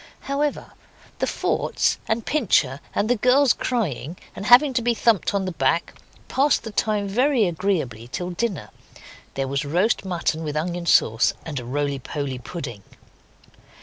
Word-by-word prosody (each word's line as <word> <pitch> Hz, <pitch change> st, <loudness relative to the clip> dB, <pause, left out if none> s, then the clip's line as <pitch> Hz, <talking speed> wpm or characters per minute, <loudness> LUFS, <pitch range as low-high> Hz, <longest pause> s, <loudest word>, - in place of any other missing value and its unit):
However, 285 Hz, +1 st, -2 dB, 0.5 s
the -, -, 0 dB
forts, -, -, 0 dB
and 220 Hz, 0 st, -1 dB
Pincher, 175 Hz, -, +2 dB, 0.2 s
and 205 Hz, -, +1 dB
the 245 Hz, -, +3 dB
girls 255 Hz, +4 st, +4 dB
crying, 175 Hz, -, -2 dB, 0.2 s
and 200 Hz, -, -5 dB
having 260 Hz, +3 st, +7 dB
to 250 Hz, -, +1 dB
be 235 Hz, 0 st, +1 dB
thumped 225 Hz, -4 st, +2 dB
on 195 Hz, -1 st, 0 dB
the 185 Hz, -, -2 dB
back, 170 Hz, 0 st, 0 dB, 0.3 s
passed 280 Hz, +2 st, +2 dB
the 225 Hz, -, -6 dB
time 210 Hz, -1 st, 0 dB
very 245 Hz, +3 st, +2 dB
agreeably 165 Hz, -, -2 dB
till 180 Hz, +8 st, -4 dB
dinner. 175 Hz, -, -3 dB, 0.6 s
There 135 Hz, 0 st, -1 dB
was 140 Hz, +2 st, -1 dB
roast 180 Hz, +12 st, +1 dB
mutton 170 Hz, -3 st, -2 dB
with 150 Hz, -1 st, -3 dB
onion 170 Hz, +2 st, -3 dB
sauce, 115 Hz, -6 st, +3 dB
and 145 Hz, -4 st, -4 dB
a 120 Hz, -, -8 dB
roly 140 Hz, +2 st, -2 dB
poly 135 Hz, -1 st, -4 dB
pudding. 125 Hz, -, -7 dB
180 Hz, 155 wpm, -23 LUFS, 145-230 Hz, 0.6 s, having